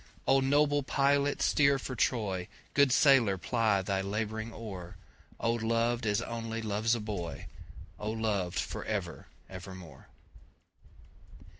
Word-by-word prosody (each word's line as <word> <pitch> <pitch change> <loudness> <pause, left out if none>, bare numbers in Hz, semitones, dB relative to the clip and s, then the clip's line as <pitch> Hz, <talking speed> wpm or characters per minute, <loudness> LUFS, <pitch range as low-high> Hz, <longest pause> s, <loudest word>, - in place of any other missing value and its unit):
O 135 0 +5
noble 145 +2 +3
pilot 140 +1 +1
steer 140 -1 +4
for 130 0 -6
Troy, 100 -6 0 0.3
Good 140 -2 +4
sailor 130 -7 +5
ply 110 -1 +1
the 95 0 -1
labouring 110 +3 -3
oar,O 100 +1 -6
loved 115 0 0
as 105 -1 +1
only 115 -1 -4
loves 110 +1 0
a - - -3
boy!O 105 +1 -7
loved 105 -5 -1
for - - -3
ever - - -4 0.2
evermore! 95 -2 -10
115 Hz, 115 wpm, -30 LUFS, 100-130 Hz, 0.3 s, O